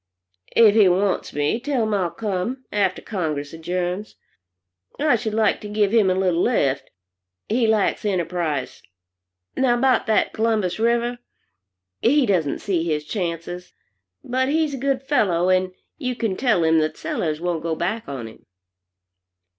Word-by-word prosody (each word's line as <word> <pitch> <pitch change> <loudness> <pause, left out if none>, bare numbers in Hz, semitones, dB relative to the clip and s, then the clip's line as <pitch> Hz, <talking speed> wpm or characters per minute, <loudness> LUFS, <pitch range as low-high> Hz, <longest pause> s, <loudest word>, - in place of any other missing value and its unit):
"If 220 -3 +7
he 210 -3 +6
wants 190 +2 0
me, 145 +10 0
tell 255 -2 -1
him 215 -1 -1
I'll 185 -4 +1
come, 220 +7 -3
after 195 -3 0
Congress 155 -8 -3
adjourns. 180 +4 -3 0.8
I 295 -2 +3
should 220 -2 -3
like 220 -2 +2
to 210 - -7
give 205 -1 +1
him 220 -4 +4
a 185 - +2
little 180 -2 +1
lift. 140 - +1 0.6
He 230 +1 +1
lacks 220 -2 +1
enterprise 170 -7 -2 0.7
now, 255 -2 +2
about 255 0 +2
that 220 - +2
Columbus 215 -4 0
River. 235 +1 +1 0.8
He 280 +3 +4
doesn't 175 -9 0
see 180 -5 0
his 150 -3 -1
chances. 175 -1 -4 0.5
But 260 +2 0
he's 310 -1 +1
a - - -3
good 270 0 0
fellow, 185 - +2
and 185 0 +2 0.3
you 255 -4 -2
can 225 -5 -1
tell 220 -8 +2
him 160 0 +4
that 155 0 -1
Sellers 155 -2 -2
won't 170 -2 -2
go 165 0 -2
back 200 +6 -3
on 130 -5 -5
him." 110 - -15
200 Hz, 155 wpm, -22 LUFS, 170-230 Hz, 0.8 s, If